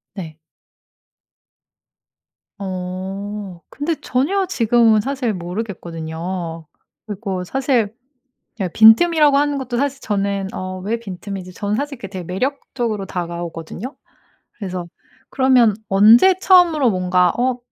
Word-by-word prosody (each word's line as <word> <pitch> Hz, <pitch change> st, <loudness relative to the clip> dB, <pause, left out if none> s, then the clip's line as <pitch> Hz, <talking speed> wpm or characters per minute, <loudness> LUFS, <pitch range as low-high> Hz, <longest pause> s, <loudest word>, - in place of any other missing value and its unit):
네. 160 Hz, -5 st, -8 dB, 2.2 s
어. 190 Hz, 0 st, -5 dB
근데 315 Hz, +3 st, -2 dB
전혀 370 Hz, +10 st, 0 dB
지금은 230 Hz, -, +3 dB
사실 260 Hz, -2 st, -2 dB
모르겠거든요. 170 Hz, -3 st, -5 dB, 0.4 s
그리고 195 Hz, -3 st, -4 dB
사실 240 Hz, -1 st, 0 dB, 0.7 s
이 185 Hz, -, 0 dB
빈틈이라고 290 Hz, +6 st, +6 dB
하는 290 Hz, 0 st, +1 dB
것도 255 Hz, -2 st, -4 dB
사실 275 Hz, +1 st, -1 dB
저는 200 Hz, -2 st, -1 dB
"어 185 Hz, 0 st, -5 dB
왜 215 Hz, +5 st, -2 dB
빈틈이지?" 190 Hz, -3 st, -7 dB
저는 205 Hz, +2 st, -2 dB
사실 280 Hz, +1 st, -4 dB
그게 195 Hz, -4 st, -7 dB
매력적으로 225 Hz, -, -3 dB
다가오거든요. 175 Hz, -, -6 dB, 0.6 s
그래서 185 Hz, -4 st, -6 dB, 0.4 s
그러면 255 Hz, -5 st, +4 dB
언제 225 Hz, -, +6 dB
처음으로 345 Hz, -9 st, +5 dB
뭔가 180 Hz, -2 st, +2 dB
어 250 Hz, 0 st, 0 dB
210 Hz, 250 characters per minute, -19 LUFS, 185-260 Hz, 2.2 s, 빈틈이라고